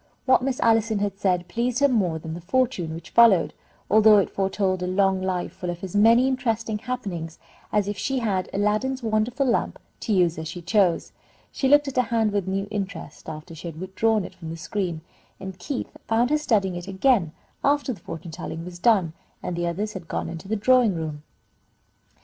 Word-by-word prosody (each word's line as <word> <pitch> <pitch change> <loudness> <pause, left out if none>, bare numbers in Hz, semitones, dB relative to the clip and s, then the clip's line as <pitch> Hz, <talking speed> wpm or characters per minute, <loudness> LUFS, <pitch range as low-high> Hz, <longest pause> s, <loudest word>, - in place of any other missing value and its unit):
What 260 - +5
Miss 260 0 -1
Allison 225 -1 +3
had 200 -1 -2
said 180 -2 +1
pleased 235 +6 -1
her 280 - +5
more 195 -11 +1
than 160 0 -7
the 170 - -7
fortune 195 -5 0
which 165 - -10
followed, 225 -7 +5 0.3
although 215 +1 +6
it 200 - +2
foretold 190 -1 0
a 180 - -2
long 190 0 +2
life 185 -1 -2
full 180 - -5
of 175 +1 -5
as 190 0 -6
many 230 +5 +5
interesting 230 -4 -1
happenings 195 -9 -5 0.3
as 210 -2 +1
if 205 0 -3
she 270 0 -1
had 200 -6 -1
Aladdin's 215 +6 0
wonderful 225 +5 0
lamp 240 - 0 0.2
to - - -3
use 175 -5 +2
as 160 - -5
she 170 +2 -6
chose. 180 0 +1 0.4
She 270 - 0
looked 290 +1 +5
at 270 - -5
her - - +6
hand 225 -2 +1
with 200 -2 -1
a - - -1
new 195 +1 -1
interest 200 -6 -5
after 160 +2 -8
she 160 +2 -8
had 160 -1 -7
withdrawn 195 +3 0
it - - -9
from 165 -2 -9
the 165 - -6
screen, 170 -1 -3 0.4
and 190 -1 -8
Keith 255 +8 -5
found 235 +4 +2
her 300 - +4
studying 205 -10 +1
it 175 +1 -6
again 195 - +2 0.3
after 285 -2 +2
the 205 - -12
fortune 165 +1 -8
telling 165 +1 -6
was 175 -1 -9
done, 190 -6 +3 0.3
and 180 - -3
the 175 0 -1
others 205 +5 -3
had 180 -4 -8
gone - - -3
into 165 +2 -8
the 220 - 0
drawing 230 -1 +4
room. 155 -2 -4
200 Hz, 205 wpm, -24 LUFS, 175-230 Hz, 0.4 s, although